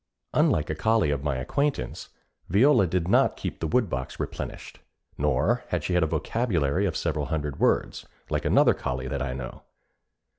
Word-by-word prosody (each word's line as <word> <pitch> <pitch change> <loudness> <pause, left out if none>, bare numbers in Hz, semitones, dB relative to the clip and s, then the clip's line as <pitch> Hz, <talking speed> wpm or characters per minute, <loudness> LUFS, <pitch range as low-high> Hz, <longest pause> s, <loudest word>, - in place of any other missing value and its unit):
Unlike 75 - +2
a - - 0
collie 110 0 +2
of 70 -1 -2
my 75 -2 0
acquaintance, 140 - -2 0.4
Viola 115 +2 +5
did 85 0 -1
not - - +3
keep - - -5
the 80 - -2
woodbox 80 - -1
replenished; - - -6 0.4
nor 75 - +1
had 85 -4 -2
she 90 - -1
a 90 - +3
vocabulary 90 - 0
of 85 - -2
several 75 -3 -1
hundred 75 -2 -3
words, - - +1 0.2
like - - -1
another - - +4
collie 65 0 -4
that 70 -2 -3
I 65 -1 -2
know. 65 -2 -7
80 Hz, 160 wpm, -26 LUFS, 70-100 Hz, 0.4 s, Viola